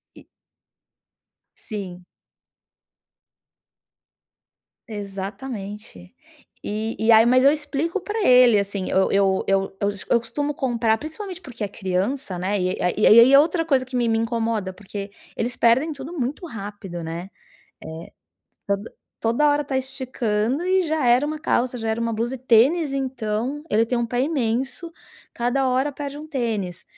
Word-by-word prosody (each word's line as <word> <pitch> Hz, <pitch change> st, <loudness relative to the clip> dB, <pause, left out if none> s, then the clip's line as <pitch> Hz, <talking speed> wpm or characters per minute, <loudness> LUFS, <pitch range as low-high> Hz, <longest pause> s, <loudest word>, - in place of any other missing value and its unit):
E -, -, -16 dB, 1.3 s
Sim. 185 Hz, -5 st, -7 dB, 2.8 s
Exatamente, 200 Hz, -, -7 dB, 0.5 s
e 215 Hz, +2 st, -3 dB
e 220 Hz, +1 st, +3 dB
aí 220 Hz, 0 st, +7 dB
mas 255 Hz, +2 st, +4 dB
eu 280 Hz, -, +8 dB
explico 300 Hz, +4 st, -2 dB
pra 420 Hz, +3 st, -3 dB
ele 250 Hz, -4 st, +6 dB
assim, 200 Hz, -1 st, -3 dB
eu 190 Hz, -, +2 dB
eu 195 Hz, -1 st, +2 dB
eu 195 Hz, 0 st, +3 dB, 0.2 s
eu 200 Hz, -, 0 dB
cos 200 Hz, -1 st, -6 dB
eu 235 Hz, -, +4 dB
costumo 285 Hz, +6 st, -3 dB
comprar, 235 Hz, -5 st, +1 dB
principalmente, 360 Hz, -, -7 dB
porque 240 Hz, -, -8 dB
é -, -, -1 dB
criança, 195 Hz, +2 st, -2 dB
né. 195 Hz, +3 st, -1 dB
E 185 Hz, 0 st, -1 dB
aí 180 Hz, -, +1 dB
e 215 Hz, -, +4 dB
aí -, -, +8 dB
e -, -, +10 dB
aí 245 Hz, +4 st, +7 dB
é 275 Hz, -, +9 dB
outra 330 Hz, +2 st, +2 dB
coisa 270 Hz, -5 st, +2 dB
que 255 Hz, 0 st, -8 dB
me 240 Hz, -1 st, +1 dB
me 225 Hz, 0 st, +2 dB
incomoda, 225 Hz, -4 st, -1 dB
porque 200 Hz, +1 st, -8 dB, 0.3 s
eles 240 Hz, +2 st, -1 dB
perdem 260 Hz, +7 st, +3 dB
tudo 285 Hz, +4 st, -8 dB
muito 290 Hz, +3 st, -3 dB
rápido, 200 Hz, -, -7 dB
né. 170 Hz, +3 st, -6 dB, 1.4 s
Eh, 200 Hz, -, +4 dB
tod 200 Hz, -, -9 dB, 0.4 s
toda 235 Hz, +7 st, +2 dB
hora 295 Hz, 0 st, +2 dB
tá 270 Hz, -1 st, -2 dB
esticando 255 Hz, 0 st, -1 dB
e 375 Hz, 0 st, +3 dB
já 315 Hz, -4 st, -1 dB
era 245 Hz, +3 st, +4 dB
1 310 Hz, 0 st, -3 dB
calça, 250 Hz, -4 st, 0 dB
já 225 Hz, -1 st, -3 dB
era 220 Hz, +1 st, -1 dB
1 230 Hz, 0 st, -1 dB
blusa 230 Hz, +3 st, -2 dB
e -, -, -8 dB
tênis 265 Hz, +6 st, +3 dB
então, 260 Hz, 0 st, -3 dB
ele 220 Hz, +2 st, +3 dB
tem 245 Hz, -, -2 dB
um 235 Hz, -1 st, 0 dB
pé 245 Hz, +1 st, -2 dB
imenso, 270 Hz, +3 st, -2 dB, 0.4 s
cada 245 Hz, +3 st, 0 dB
hora 260 Hz, +3 st, +1 dB
perde 285 Hz, 0 st, -6 dB
1 300 Hz, -, -8 dB
tênis. 225 Hz, -, -3 dB
235 Hz, 160 wpm, -23 LUFS, 210-275 Hz, 2.8 s, e